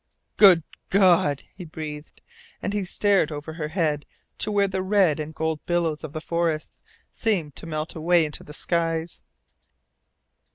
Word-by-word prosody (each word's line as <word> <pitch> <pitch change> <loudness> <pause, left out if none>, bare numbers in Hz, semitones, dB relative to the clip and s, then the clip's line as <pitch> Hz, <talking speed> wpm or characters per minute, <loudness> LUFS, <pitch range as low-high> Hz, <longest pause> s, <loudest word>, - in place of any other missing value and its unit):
"Good 185 -6 +7 0.3
God!" 175 -7 +4
he 185 - -9
breathed, 155 -2 -8 0.4
and 200 - -3
he 205 -2 -1
stared 195 -3 +2
over 150 +1 -6
her 155 -2 -4
head 155 -3 -1 0.3
to - - 0
where 200 -1 +3
the 190 -1 -2
red 185 -5 +3
and 155 0 -4
gold 160 -1 -2
billows 170 -3 0
of 155 - -6
the 155 - -3
forests 165 -2 -1 0.4
seemed 180 - -1
to - - -7
melt 155 0 -4
away 165 +1 +3
into 150 - -7
the - - -12
skies. 165 -1 -1
165 Hz, 155 wpm, -25 LUFS, 155-185 Hz, 0.4 s, Good